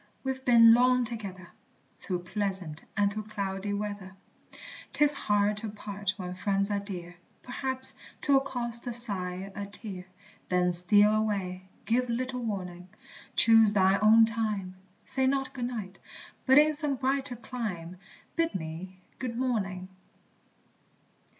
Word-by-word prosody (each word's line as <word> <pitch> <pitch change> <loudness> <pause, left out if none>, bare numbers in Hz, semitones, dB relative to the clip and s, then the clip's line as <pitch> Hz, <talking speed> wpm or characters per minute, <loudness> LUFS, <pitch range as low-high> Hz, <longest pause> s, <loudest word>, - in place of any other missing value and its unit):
we've 265 0 -3
been 230 -2 +8
long 250 +1 +4
together, 200 -6 -7 0.5
Through 180 -2 -4
pleasant 190 -5 -4
and 205 0 +2
through 215 0 -5
cloudy 200 -2 -4
weather; 205 -2 -4 0.8
'Tis 295 0 +3
hard 205 -2 +1
to 215 0 +2
part 205 -1 -4
when 180 -2 -5
friends 200 +2 0
are 205 - +1
dear, 180 -4 -8 0.3
Perhaps 260 +1 +2 0.3
'twill 280 -2 +4
cost 240 -3 -4
a 240 - -2
sigh, 195 -5 -3
a 200 0 -5
tear: 200 -3 -8 0.4
Then 180 -1 +2
steal 205 +5 +4
away, 190 -4 -2 0.2
give 245 +2 +1
little 250 +2 -2
warning, 180 -4 -5 0.5
Choose 225 -2 +5
thine 195 0 +4
own 220 +1 +7
time; 210 -4 -2 0.3
Say 265 -1 0
not 270 0 0
Good 250 -3 -3
Night, 215 -6 -6 0.5
but 265 +1 +6
in 305 +1 +6
some 295 -2 -1
brighter 265 0 -1
clime 210 -8 -6 0.4
Bid 330 -1 0
me 185 +2 -6 0.2
Good 240 -3 -4
Morning. 195 -8 -2
210 Hz, 135 wpm, -29 LUFS, 190-245 Hz, 0.8 s, been